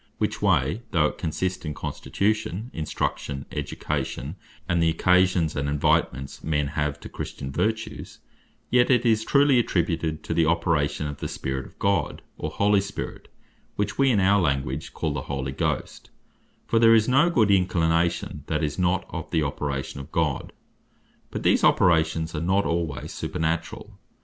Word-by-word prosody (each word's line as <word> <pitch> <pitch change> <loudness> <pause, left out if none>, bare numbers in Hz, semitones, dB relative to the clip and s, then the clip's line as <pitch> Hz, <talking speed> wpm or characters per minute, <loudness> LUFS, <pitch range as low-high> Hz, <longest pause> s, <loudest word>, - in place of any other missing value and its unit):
Which - - -2
way, 75 - +2
though 85 -6 +2
it - - -2
consist 90 +3 -2
in 75 -3 -4
Constitution, 110 +2 -2
Instruction, 70 -3 -3
Education, 70 +1 -3 0.3
and 85 -1 +1
the 80 - +4
occasions 90 -1 +3
and 70 0 -1
invitements 70 -1 0
men 75 -2 0
have 75 -1 -2
to - - -8
Christian 65 -1 -6
vertues; 110 +8 -2 0.5
yet 125 0 +4
it 125 -2 +3
is 110 -2 +3
truly 140 0 +4
attributed 80 -6 -1
to - - -3
the 80 -1 +3
operation 80 -3 +1
of 75 -1 -5
the - - -4
Spirit 65 0 -4
of - - -20
God, 100 0 0
or - - -4
Holy 100 0 +3
Spirit 100 +1 -6 0.5
(which 105 - -2
we 135 0 +5
in 110 -5 +3
our 100 +1 +4
language 70 -2 -1
call 80 -3 -2
the 70 - -3
Holy 70 -1 -2
Ghost): 70 - -3 0.6
For 115 - +2
there 115 0 +7
is 110 -1 +3
no 135 +7 +4
good 110 -11 +3
inclination, 85 -3 +1
that - - -1
is 75 +3 -2
not 90 +1 +1
of 80 -2 -5
the 80 -2 +1
operation 70 -2 -3
of 70 - -10
God. - - -1 0.8
But - - -5
these - - +3
operations 80 -1 +3
are 75 - -3
not 95 +4 +2
alwaies 85 -4 -2
supernaturall. 80 +1 -3
85 Hz, 160 wpm, -25 LUFS, 75-100 Hz, 0.8 s, there